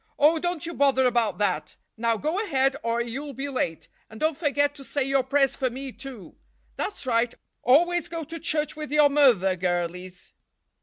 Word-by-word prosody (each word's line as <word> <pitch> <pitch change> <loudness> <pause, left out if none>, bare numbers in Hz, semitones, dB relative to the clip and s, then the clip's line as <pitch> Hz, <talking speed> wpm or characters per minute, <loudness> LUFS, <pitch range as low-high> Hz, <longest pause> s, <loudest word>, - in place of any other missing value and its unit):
"Oh, 315 +3 +4
don't 350 -1 -2
you 340 - -5
bother 275 -3 +3
about 230 -6 +1
that. 205 - -1 0.2
Now 230 0 0
go 320 - -1
ahead 270 -8 +1
or 230 +1 0
you'll 270 +5 -5
be 275 +2 -3
late, 170 - -2 0.2
and 220 - -11
don't 315 0 +1
forget 285 -1 +1
to 285 -2 -12
say 275 +2 -1
your 270 0 +2
prayers 275 +1 +2
for 260 -2 0
me, 265 +2 -6
too. 255 -7 -10 0.4
That's 405 - -5
right, 235 -1 +1 0.3
always 345 +6 +3
go 330 -1 -5
to 330 +2 -7
church 305 -1 -1
with 300 -2 -6
your 300 -1 +5
mother, 235 -11 +4
girlies." 180 0 -3
270 Hz, 185 wpm, -25 LUFS, 230-300 Hz, 0.4 s, your